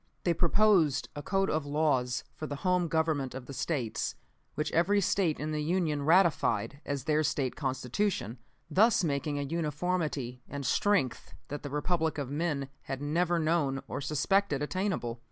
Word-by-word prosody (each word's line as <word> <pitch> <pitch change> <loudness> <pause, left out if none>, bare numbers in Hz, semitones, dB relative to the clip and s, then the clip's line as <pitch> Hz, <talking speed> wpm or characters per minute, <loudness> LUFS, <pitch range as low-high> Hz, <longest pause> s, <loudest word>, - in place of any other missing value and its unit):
"They 175 - +3
proposed 170 -4 +3
a 145 - -4
code 195 +5 0
of 155 0 0
laws 145 -5 +1
for 155 - -6
the 145 - -4
home 180 -1 +3
government 155 -5 0
of 130 -2 -6
the 140 - -8
States, 130 -6 -2 0.4
which 150 0 -1
every 190 +5 +3
State 180 -4 +1
in 155 +1 -3
the 150 0 -1
Union 160 -2 0
ratified 150 - +2
as 140 -3 -2
their 155 +1 +2
State 135 -3 -1
Constitution, 130 - -2 0.3
thus 215 +1 +4
making 145 -1 -1
a 145 - -1
uniformity 150 -4 -2
and 140 0 -5
strength 135 - +1
that 145 0 -5
the 145 - -6
Republic 160 +2 0
of 140 -2 -3
men 145 -3 -1
had 135 - -5
never 170 +4 +1
known 155 -5 +1
or - - -4
suspected 150 +2 +1
attainable. 155 - -2
150 Hz, 160 wpm, -30 LUFS, 140-175 Hz, 0.4 s, thus